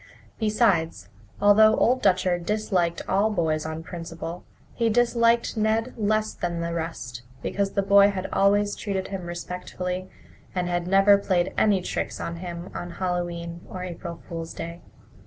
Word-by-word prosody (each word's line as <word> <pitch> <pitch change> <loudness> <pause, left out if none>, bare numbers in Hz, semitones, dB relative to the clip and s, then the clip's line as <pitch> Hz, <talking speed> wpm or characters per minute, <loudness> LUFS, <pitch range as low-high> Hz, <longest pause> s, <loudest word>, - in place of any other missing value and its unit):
Besides, 185 - +1 0.3
although 215 +2 +6
Old 255 +2 +3
Dutcher 185 -2 +2
disliked 180 -3 0
all 200 +3 +2
boys 160 -6 0
on 160 +1 -5
principle, 165 0 -7 0.3
he 230 -1 +1
disliked 235 0 +3
Ned 220 +2 +1
less 215 0 0
than 170 -1 -3
the 170 0 -2
rest 145 -8 -5 0.2
because 200 -1 -1
the 200 - +1
boy 200 +1 +6
had 195 -2 -3
always 205 +1 +3
treated 195 -3 -3
him 190 -3 -5
respectfully 180 +1 -5 0.5
and 180 -1 0
had 175 0 -1
never 195 +1 +6
played 185 -3 0
any 200 -4 +3
tricks - - -3
on 170 0 -4
him 175 0 -7
on 175 -1 -6
Hallowe'en 175 -2 -3
or 185 -1 -6
April 170 -1 -7
Fool's 165 -1 -6
Day. 170 +1 -6
185 Hz, 150 wpm, -25 LUFS, 170-205 Hz, 0.5 s, although